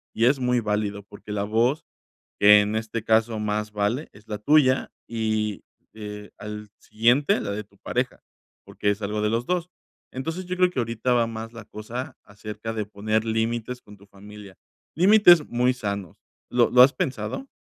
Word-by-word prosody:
y 115 - +2
es 135 +3 +3
muy 125 -1 +1
válido, 105 -1 -2
porque 105 +1 -12
la 100 -1 -1
voz 120 +9 +1 0.5
que 105 0 +8
en 105 +1 -2
este 110 0 -3
caso 110 0 +2
más 105 0 -2
vale 105 +8 -1
es 105 +1 -19
la 105 - -4
tuya 135 +1 +3 0.2
y, 110 -2 -2 0.3
eh, 105 -1 -8
al 105 0 -7
siguiente, 125 - +2
la - - -3
de 105 +1 -4
tu 100 -1 -28
pareja, - - -3 0.4
porque 105 - -2
es 100 +1 -1
algo 105 +1 -2
de 105 - +1
los 115 +2 -1
2 180 +1 -1 0.4
Entonces, 165 +8 -5
yo 180 +1 -4
creo 180 0 +4
que 135 - -3
ahorita 115 +1 -1
va 120 -1 +2
más 115 0 -7
la 115 -1 -9
cosa 115 +5 -7
acerca 105 +2 -7
de 110 -2 -3
poner 110 +1 -1
límites 115 +2 -2
con 105 0 -15
tu 100 +1 -19
familia, 100 -1 -13 0.4
límites 175 -3 +6
muy 125 +1 +1
sanos, 100 -7 -5 0.3
¿lo 120 -1 +3
lo 125 - +7
has 130 +2 +8
pensado? 265 - -3
110 Hz, 180 wpm, -24 LUFS, 105-125 Hz, 0.5 s, que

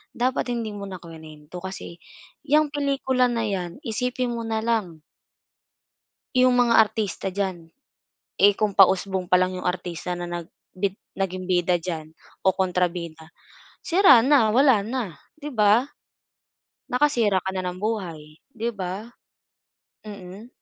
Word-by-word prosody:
dapat 255 +2 0
hindi 230 -3 -3
mo 200 - -7
na 190 - -7
kinwento, 160 0 -11
kasi, 180 -2 -8 0.5
yang 295 0 +3
pelikula 275 -3 +1
na 235 -2 -1
yan, 195 - -4
isipin 250 +1 -2
mo 230 -1 -4
na 220 -1 -1
lang 205 -9 -1 1.3
Yung 255 0 +4
mga 240 -1 +4
artista 210 -3 -3
diyan, 185 -4 -4 0.7
eh, 200 0 +6
kung 210 -2 0
pausbong 190 -1 +3
palang 185 0 +3
yung - - -1
artista 180 0 -4
na 175 - -4
nag 175 -1 -6 0.3
bid 190 0 0 0.2
naging 185 -1 -2
bida 180 -1 +2
diyan 160 -2 -5 0.4
o 190 - +6
kontrabida, 175 -3 -2 0.5
sira 335 - +6
na, 265 -6 +5
wala 260 -4 +5
na, 225 - -4 0.2
'di 295 0 -6
ba? 215 +3 +4 1.1
Nakasira 245 -7 +2
ka 190 - -2
na 185 - -1
ng 180 0 -4
buhay, 170 -8 -4
'di 230 +1 -2
ba? 190 +2 -4 1.0
Mm. 200 +1 -10
200 Hz, 135 wpm, -24 LUFS, 180-235 Hz, 1.3 s, eh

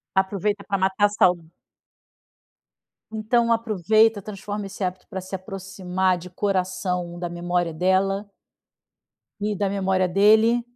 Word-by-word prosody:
Aproveita 200 +1 0
para 195 -1 0
matar 190 +2 +2
sauda 175 -5 +2 1.6
Então 230 +2 +1
aproveita, 220 -1 +2
transforma 205 0 -6
esse 195 0 -5
hábito 185 0 -4
para 190 - -5
se 185 +1 -9
aproximar 190 -1 -2
de 180 +1 -10
coração 180 -2 -2
da 175 -1 -3
memória 175 -1 -2
dela 195 +3 +1 1.1
e 210 -1 -1
da 200 0 0
memória 190 -2 +1
dele, 220 +5 +4
190 Hz, 115 wpm, -23 LUFS, 180-205 Hz, 1.6 s, dele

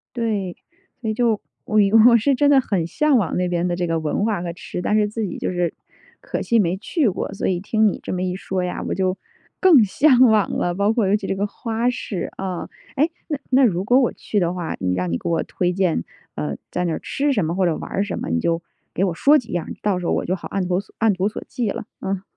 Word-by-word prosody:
对， 210 -6 -2 0.5
所 225 - -2
以 - - 0
就， 225 -2 +1 0.3
我 215 - 0 0.3
我 235 - +6
是 275 +5 +2
真 285 +2 +3
的 280 - +6
很 180 -8 -1
向 300 - +2
往 195 -8 0
那 180 0 +1
边 175 0 0
的 175 - -1
这 175 0 -1
个 165 -1 0
文 155 +6 -1
化 215 -5 0
和 175 -1 -4
吃， 175 0 -6
但 210 - +1
是 210 - +3
自 215 +1 -4
己 - - -5
就 - - -2
是 175 -2 -1 0.5
可 - - -4
惜 235 - +2
没 180 -2 +1
去 265 - 0
过。 185 - -4
所 195 - -2
以 180 -2 0
听 215 +3 +2
你 - - -1
这 - - -6
么 180 - -2
一 180 0 -2
说 190 -1 -3
呀， 180 - -3
我 - - -1
就 185 0 0 0.4
更 335 -11 +7
向 260 +5 +4
往 220 -6 +5
了。 175 - -1
包 200 +3 +2
括 225 -4 +1
尤 195 - +3
其 205 -2 -3
这 195 - -1
个 200 - 0
花 230 +3 -1
市， 205 -7 -4
啊。 185 -2 -4 0.3
哎， 300 +5 +3 0.2
那 300 -4 -2
那 265 +1 +5
如 185 -5 +1
果 245 +6 +4
我 250 - +2
去 210 - -2
的 175 -2 0
话， 175 -3 -4
你 90 -1 0
让 90 -1 -2
你 85 - 0
给 - - -4
我 165 -1 +1
推 180 -1 -1
荐， 180 - +1 0.3
呃， 75 -2 -3 0.2
在 180 0 -1
那 165 - -1
吃 285 +1 -1
什 205 -10 +1
么 160 - -1
或 190 0 +2
者 170 -3 +1
玩 - - -7
儿 200 - 0
什 205 - -4
么， - - -4
你 80 0 +1
就 165 - 0 0.3
给 185 - 0
我 180 - -1
说 285 - +5
几 240 - -5
样 175 -2 -2
儿， - - -7
到 195 -3 +1
时 180 - -6
候 - - +1
我 - - -1
就 185 - 0
好 175 - -8
按 195 -2 -1
图 180 0 +1 0.2
按 220 -2 +3
图 190 +2 0
索 - - -7
骥 235 -4 -2
了， - - -5 0.2
嗯。 195 0 -3
195 Hz, 285 characters per minute, -22 LUFS, 175-225 Hz, 0.5 s, 更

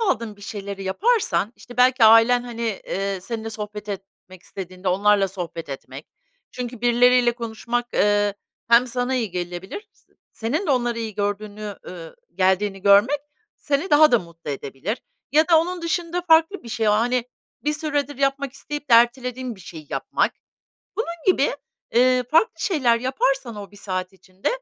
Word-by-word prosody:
aldığın 230 - -1
bir 205 - -16
şeyleri 200 -1 -6
yaparsan, 370 - +1
işte, 245 - -13
belki 250 -1 +5
ailen, 230 +2 +6
hani, 230 -4 -4
eee, 195 -1 -2
seninle 225 +3 -5
sohbet 210 -1 -7
etmek 195 -2 -9
istediğinde 185 0 -6
onlarla 200 +1 +3
sohbet 170 -4 -6
etmek 135 - -8 0.4
çünkü 245 -2 -6
birileriyle 245 0 +4
konuşmak, 235 +1 -4
ııı, 205 0 +2 0.3
hem 235 +2 +6
sana 250 +1 -1
iyi 230 -6 -1
gelebilir, 180 - -6
s - - -33 0.2
senin 295 - -2
de - - +1
onları 240 -3 +1
iyi 220 -2 -4
gördüğünü, 205 0 -4
ııı, 170 -3 -9 0.2
geldiğini 190 +1 +1
görmek 205 +8 +5 0.4
seni 290 +6 -1
daha 295 -2 +6
da 240 - +6
mutlu 170 -3 -9
edebilir 140 - -5 0.3
ya 310 +3 +4
da 330 - +7
onun 355 +1 -4
dışında 340 +1 -2
farklı 330 +3 +3
bir 235 - -10
şey 225 -2 0
o, 210 - +5
hani, 240 +3 +1 0.4
bir 300 - +1
süredir 290 -2 -2
yapmak 275 -1 0
isteyip 290 +1 -7
de 235 - +8
ertelediğin 250 +1 +2
bir 190 - -16
şeyi 160 -3 -10
yapmak. - - 0 0.6
Bunun 385 -6 -2
gibi, 320 -8 +3 0.4
eee, 250 +1 +4
farklı 330 +9 +3
şeyler 255 - +2
yaparsan 260 -2 -1
o 200 -1 -8
1 205 - -16
saat 185 -1 -4
içinde 190 0 -5
230 Hz, 160 wpm, -23 LUFS, 200-265 Hz, 0.6 s, de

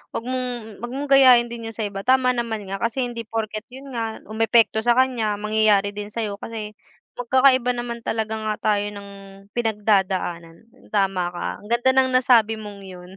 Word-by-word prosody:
wag 230 - -4
mong 245 -4 -5
wag 240 - -5
mong 280 +1 -4
gayahin 255 -3 +6
din 230 -1 -6
yun 225 - -11
sa 220 - -2
iba 195 -1 -5
tama 255 -1 +4
naman 225 -4 -3
nga, 195 - -3
kasi 235 +3 -1
hindi 235 -1 -6
porket 215 -1 -4
yun 265 +1 -11
nga 225 -2 -4
umepekto 225 0 +2
sa 240 +1 +3
kanya 240 -5 +1
mangyayari 210 -1 +2
din 205 0 -6
sayo 210 -3 -3
kasi, 215 -1 -7 0.5
magkakaiba 255 0 +3
naman 240 -1 -5
talaga 220 -1 -3
nga 215 -1 -2 0.2
tayo 205 0 0
ng 200 0 -9 0.4
pinagdadaanan. 195 -7 0 0.3
Tama 195 -3 0
ka, - - -4
ang 205 - -14
ganda 240 +3 +3
ng 260 0 +3
nasabi 235 -4 +4
mong 210 -2 -9
yun, 180 -1 -11
225 Hz, 180 wpm, -22 LUFS, 210-245 Hz, 0.5 s, gayahin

